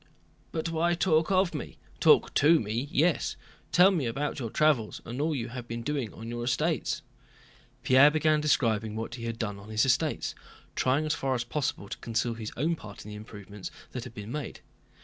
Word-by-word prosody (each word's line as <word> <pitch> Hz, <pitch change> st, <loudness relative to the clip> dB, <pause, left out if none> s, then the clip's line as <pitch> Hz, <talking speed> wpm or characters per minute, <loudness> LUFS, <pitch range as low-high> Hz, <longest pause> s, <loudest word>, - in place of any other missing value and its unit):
"But 165 Hz, +1 st, -2 dB
why 170 Hz, +1 st, +1 dB
talk 160 Hz, -3 st, +2 dB
of 185 Hz, -2 st, +3 dB
me?... -, -, -6 dB, 0.2 s
Talk -, -, +5 dB
to 160 Hz, +3 st, +5 dB
me, 115 Hz, +5 st, -2 dB
yes, 160 Hz, +2 st, +1 dB, 0.4 s
tell 185 Hz, +3 st, +7 dB
me 160 Hz, -10 st, 0 dB
about 140 Hz, +6 st, -2 dB
your 115 Hz, -4 st, -3 dB
travels 145 Hz, -5 st, +2 dB
and 120 Hz, +4 st, -4 dB
all 155 Hz, 0 st, +1 dB
you 120 Hz, -3 st, -3 dB
have 125 Hz, 0 st, -7 dB
been 115 Hz, 0 st, -5 dB
doing 140 Hz, -6 st, -2 dB
on 115 Hz, -, -9 dB
your 120 Hz, 0 st, -4 dB
estates." 150 Hz, +4 st, 0 dB, 0.8 s
Pierre 130 Hz, +3 st, +7 dB
began 155 Hz, 0 st, +2 dB
describing 110 Hz, -7 st, +1 dB
what 115 Hz, +1 st, -4 dB
he 115 Hz, -1 st, -6 dB
had 115 Hz, -1 st, -3 dB
done 105 Hz, -3 st, -3 dB
on 100 Hz, +2 st, -12 dB
his 110 Hz, +2 st, +2 dB
estates, 130 Hz, -, +1 dB, 0.4 s
trying 135 Hz, +4 st, +2 dB
as 155 Hz, -, +1 dB
far 135 Hz, -1 st, -1 dB
as 120 Hz, -, -1 dB
possible 120 Hz, -5 st, -2 dB
to -, -, -7 dB
conceal 115 Hz, +1 st, -1 dB
his 110 Hz, -2 st, -6 dB
own 160 Hz, +6 st, +1 dB
part 105 Hz, -10 st, -11 dB
in -, -, -8 dB
the 105 Hz, -, -7 dB
improvements 105 Hz, -2 st, -9 dB, 0.2 s
that 125 Hz, -, -5 dB
had 115 Hz, -, -10 dB
been 105 Hz, 0 st, -7 dB
made. 150 Hz, +1 st, -5 dB
125 Hz, 200 wpm, -29 LUFS, 115-155 Hz, 0.8 s, tell